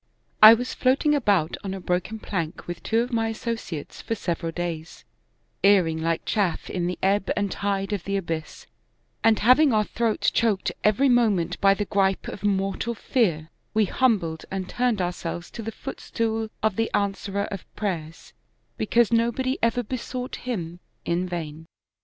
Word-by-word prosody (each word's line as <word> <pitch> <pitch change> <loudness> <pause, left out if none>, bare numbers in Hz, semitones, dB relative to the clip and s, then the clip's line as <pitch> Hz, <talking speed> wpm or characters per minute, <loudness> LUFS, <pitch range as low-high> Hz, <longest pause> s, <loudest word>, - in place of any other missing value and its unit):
" - - -44
I 215 +1 +12
was 250 +2 -4
floating 270 +4 +2
about 200 - +2
on 195 -1 -3
a - - -6
broken 180 +4 -2
plank 170 -7 -4
with 175 -1 -6
two 225 +1 +1
of 245 +1 -4
my 225 -1 +1
associates 225 -8 -5
for 225 - -2
several 170 -4 -3
days, 165 -2 -5 0.6
erring 180 -5 +4
like 165 0 -1
chaff 200 -6 -1
in 175 -2 -1
the 180 - -3
ebb 195 +1 +2
and 200 -2 0
tide 200 0 -1
of 195 -4 -3
the 200 0 0
abyss, 165 -4 -5 0.6
and 225 -1 +5
having 260 +6 +5
our 215 -2 +3
throats 225 +1 0
choked 215 -5 +1
every 215 +7 +4
moment 210 -9 +2
by 195 0 +5
the 205 - -2
gripe 195 -1 +1
of - - -7
mortal 195 +3 0
fear; 170 - 0 0.2
we 215 -1 +4
humbled 190 -9 +1
and 190 -1 -4
turned 240 -5 0
ourselves 175 -1 -4
to 230 - -7
the 225 0 -4
footstool 225 0 -3
of 215 -3 +1
the 225 0 +1
Answerer 200 0 -1
of 195 -3 -5
prayers, 165 -6 -4 0.4
because 230 +1 +2
nobody 235 +3 +1
ever 235 +2 +1
besought 250 +2 -5
Him 175 -9 -5 0.3
in 180 +2 -1
vain. 160 -2 -6
200 Hz, 165 wpm, -25 LUFS, 175-230 Hz, 0.6 s, I